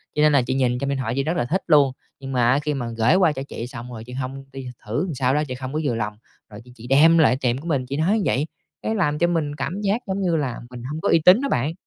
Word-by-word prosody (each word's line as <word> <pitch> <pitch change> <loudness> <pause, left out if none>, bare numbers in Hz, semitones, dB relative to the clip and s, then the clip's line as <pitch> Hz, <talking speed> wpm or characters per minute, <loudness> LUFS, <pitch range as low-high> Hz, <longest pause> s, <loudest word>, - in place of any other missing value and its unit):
cho 150 - +1
nên 150 0 +5
là 140 -2 +4
chị 125 +2 -2
nhìn 125 -2 +1
trong 140 +1 -2
điện 140 - -1
thoại 120 -3 -2
chị 135 - 0
rất 165 +4 -1
là 120 - 0
thích 185 +10 -1
luôn. 145 -5 +5 0.3
Nhưng 135 -1 -7
mà 120 -2 +3
á 135 - +3
khi 150 0 -2
mà 130 -4 -3
gởi 115 +8 +4
qua 180 -4 +4
cho 135 - -5
chị 115 - -6
xong 125 0 -9
rồi, 110 -2 -8
chị 125 - -10
hông 135 +1 -5
đi 135 -1 -7 0.2
thử 115 - -1
làm 175 - -4
sao 130 0 +1
đó 150 +1 +1
chị 130 - -5
không 130 +1 -6
có 155 - -1
vừa 130 -6 0
lòng, 105 -2 -3 0.3
rồi 105 +1 -11
chị 125 - -15
chị 120 0 -11
đem 155 +5 +6
lại 155 -5 +4
tiệm 125 -1 +1
của 150 +5 -8
mình, 140 -6 0
chị 135 +3 -4
nói 180 +8 +2
như 210 - -1
vậy, 145 +4 0 0.3
cái 220 - -2
làm 150 -8 +1
cho 175 - +3
mình 160 -4 -1
cảm 185 +6 -4
giác 205 +3 0
giống 195 +1 -2
như 175 -3 +1
là 135 -6 -2
mình 125 -1 -9
hông 150 +5 -5
có - - 0
uy 165 - +5
tín 185 +7 +7
đó 280 - -1
bạn. 140 +6 0
140 Hz, 325 wpm, -22 LUFS, 125-160 Hz, 0.3 s, tín